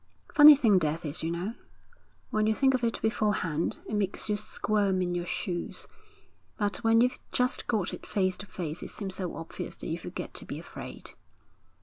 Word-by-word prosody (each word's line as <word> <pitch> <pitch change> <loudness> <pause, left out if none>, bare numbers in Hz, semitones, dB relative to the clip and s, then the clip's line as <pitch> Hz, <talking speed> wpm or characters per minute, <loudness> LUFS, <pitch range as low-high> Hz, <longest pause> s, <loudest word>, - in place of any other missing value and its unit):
'Funny 300 0 +11
thing 220 -9 +4
death 160 +1 -1
is, 150 +1 -2
you 160 - -1
know! 175 +6 -3 0.8
When 215 0 +2
you 220 - +2
think 270 +2 +4
of 255 -2 0
it 230 -1 0
beforehand, 205 -7 0
it - - -5
makes 205 0 -1
you 210 - +2
squirm 205 -2 0
in 180 -1 0
your 175 0 -2
shoes, 175 -3 -3 0.7
but 205 -1 0
when 225 0 +4
you've 250 +1 +2
just 250 0 +1
got 205 -6 0
it - - -8
face 185 -2 +1
to 205 - -7
face 165 -4 -5
it - - -6
seems 195 -3 -5
so 185 -3 -3
obvious 165 0 -6
that - - -7
you - - -2
forget - - -6
to - - -6
be - - -5
afraid.' - - -9
205 Hz, 195 wpm, -29 LUFS, 175-220 Hz, 0.8 s, Funny